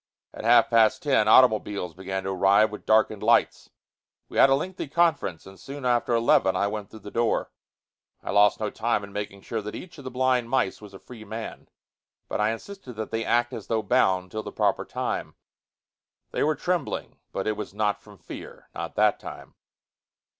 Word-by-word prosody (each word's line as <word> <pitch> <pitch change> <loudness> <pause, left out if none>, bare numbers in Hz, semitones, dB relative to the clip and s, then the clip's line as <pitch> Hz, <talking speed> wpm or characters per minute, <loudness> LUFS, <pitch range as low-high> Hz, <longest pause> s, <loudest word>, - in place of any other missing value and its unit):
At - - -8
half 120 +1 +5
past 115 -2 +4
ten, 135 -7 +3
automobiles 105 -7 +4
began 95 +1 -4
to 95 - -3
arrive 100 +3 +4
with 105 - -9
darkened 110 -1 +3
lights. - - +2 0.6
We - - -2
had 135 - +7
a 135 - +5
lengthy 180 +3 -4
conference, 145 - 0
and 95 0 -13
soon 140 -1 -8
after 120 -1 +2
eleven 105 -5 +3
I 100 - +1
went 105 -1 -4
through 110 - -12
the 105 - -9
door. 115 -1 0 0.7
I - - -3
lost 105 0 +4
no 105 -1 -2
time 115 -2 -1
in 100 0 -10
making 100 -1 -5
sure 115 +2 -4
that 105 +1 -7
each 170 -3 -10
of - - -10
the 130 - -5
blind 125 -2 +1
mice 125 -7 0
was 100 -2 -12
a - - -11
free 110 +3 -12
man, 110 +2 -7 0.6
but - - -2
I 105 - +3
insisted 130 - -7
that 110 -1 -6
they 115 0 -1
act 120 +2 +1
as - - -7
though 110 -1 0
bound 95 -2 +2
till 110 - -3
the - - -8
proper - - 0
time. - - -4 1.0
They - - -2
were 155 +1 +2
trembling, 180 -5 -3
but 95 - -3
it 110 - 0
was 105 - -6
not 105 0 -1
from 105 -1 -16
fear, 80 - -11
not - - -6
that - - +3
time. - - -10
110 Hz, 195 wpm, -26 LUFS, 100-125 Hz, 1.0 s, had